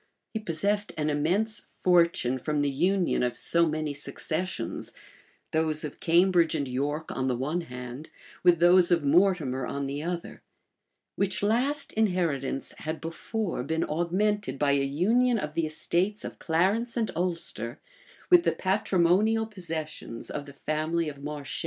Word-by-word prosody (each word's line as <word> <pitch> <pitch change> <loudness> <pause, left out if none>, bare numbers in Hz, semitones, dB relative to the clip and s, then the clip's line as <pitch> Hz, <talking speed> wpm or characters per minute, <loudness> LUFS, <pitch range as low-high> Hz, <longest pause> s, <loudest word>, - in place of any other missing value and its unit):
He 220 - -1
possessed 205 +2 0
an 150 0 0
immense 185 +10 0 0.2
fortune 170 -8 +3
from 150 +2 -1
the 140 - +1
union 180 +6 +1
of 125 -1 0
so 170 0 +3
many 155 -1 -2
successions, 155 0 -4 0.6
those 155 -1 +1
of 150 - -6
Cambridge 170 -1 +4
and 140 -3 -1
York 145 +5 -2
on 130 - -2
the 125 - +1
one 150 +8 -1
hand, 125 -1 -8 0.3
with 175 -2 +5
those 175 +1 +6
of 170 -3 +3
Mortimer 145 -5 +2
on 140 0 -3
the 140 +2 -3
other; 170 +1 -5 0.7
which 190 -1 -1
last 260 +8 +1
inheritance 170 -11 0
had 155 +1 -4
before 170 - -3
been 160 +5 -1
augmented 180 0 0
by 145 0 +2
a 140 0 +3
union 225 - +2
of 150 -7 -4
the 165 -1 0
estates 180 +6 -1
of - - -8
Clarence 195 +9 +1
and 225 -2 0
Ulster 175 0 -2 0.5
with 355 -1 +8
the - - +1
patrimonial 195 +3 +2
possessions 160 - -6
of 145 -1 -5
the 140 - -10
family 155 +3 -1
of 140 -1 -10
Marche. 145 -1 -5
165 Hz, 150 wpm, -27 LUFS, 145-190 Hz, 0.7 s, with